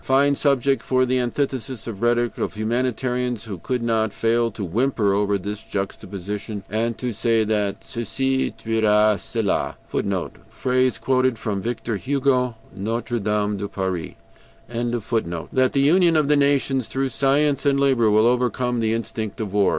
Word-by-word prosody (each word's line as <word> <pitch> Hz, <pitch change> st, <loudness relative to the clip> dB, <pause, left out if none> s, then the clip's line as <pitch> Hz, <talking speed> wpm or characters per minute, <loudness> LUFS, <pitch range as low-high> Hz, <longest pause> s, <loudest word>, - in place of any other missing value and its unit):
Fine 140 Hz, +2 st, +3 dB
subject 140 Hz, -1 st, +2 dB
for 130 Hz, 0 st, +2 dB
the 130 Hz, 0 st, +1 dB
antithesis 130 Hz, -1 st, -2 dB
of 105 Hz, -4 st, -6 dB
rhetoric, 120 Hz, 0 st, +1 dB
of -, -, -2 dB
humanitarians 125 Hz, +1 st, -1 dB
who 100 Hz, -6 st, -7 dB
could 125 Hz, +7 st, -2 dB
not 110 Hz, -2 st, +1 dB
fail 115 Hz, +2 st, +1 dB
to 105 Hz, -1 st, -6 dB
whimper 105 Hz, +1 st, +1 dB
over 100 Hz, 0 st, +1 dB
this 100 Hz, +2 st, -5 dB
juxtaposition, 100 Hz, +1 st, -5 dB
and 115 Hz, +1 st, -1 dB
to 125 Hz, -2 st, -3 dB
say 115 Hz, +1 st, +2 dB
that 105 Hz, -2 st, -1 dB
'CECI 130 Hz, +3 st, -1 dB
TUERA 110 Hz, -2 st, +3 dB
CELA,' 110 Hz, -4 st, -1 dB
[footnote: -, -, -2 dB
Phrase 130 Hz, 0 st, +1 dB
quoted 130 Hz, -2 st, +1 dB
from 105 Hz, -3 st, -2 dB
Victor 115 Hz, 0 st, -3 dB
Hugo, 130 Hz, -1 st, +1 dB, 0.2 s
"Notre 115 Hz, +4 st, -2 dB
Dame 105 Hz, 0 st, 0 dB
de 100 Hz, +1 st, -3 dB
Paris."] 95 Hz, -4 st, -3 dB, 0.5 s
that 120 Hz, -1 st, -1 dB
the 140 Hz, -, +2 dB
union 170 Hz, +3 st, +4 dB
of 155 Hz, -2 st, +3 dB
the 150 Hz, -, +4 dB
nations 140 Hz, -3 st, +2 dB
through 135 Hz, 0 st, -1 dB
science 140 Hz, +2 st, +2 dB
and 140 Hz, -1 st, +2 dB
labor 130 Hz, -5 st, +3 dB
will 110 Hz, +1 st, +4 dB
overcome 125 Hz, 0 st, +1 dB
the 110 Hz, 0 st, +1 dB
instinct 110 Hz, -2 st, -4 dB
of 105 Hz, -3 st, -4 dB
war. 100 Hz, -1 st, +4 dB
115 Hz, 155 wpm, -23 LUFS, 105-130 Hz, 0.5 s, union